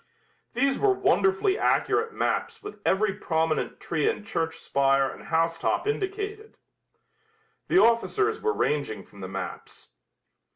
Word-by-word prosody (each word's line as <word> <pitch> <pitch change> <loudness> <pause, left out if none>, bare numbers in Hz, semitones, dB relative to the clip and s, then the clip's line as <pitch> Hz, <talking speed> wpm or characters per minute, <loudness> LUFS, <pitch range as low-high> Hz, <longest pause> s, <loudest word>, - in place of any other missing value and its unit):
These 275 +2 +1
were 415 - +3
wonderfully 380 - +2
accurate 455 0 +1
maps 430 - -2
with 415 0 -9
every 195 +1 +2
prominent 160 -5 -1
tree 160 -3 0
and 210 - -4
church 165 -6 -2
spire 135 -3 +2
and - - -9
house 165 0 0
top - - 0
indicated. 415 +1 -3 1.1
The 355 - +2
officers 410 - +3
were 440 - +1
ranging 140 - -1
from 100 - -17
the 95 - -6
maps. 95 - -7
210 Hz, 130 wpm, -26 LUFS, -, 1.1 s, were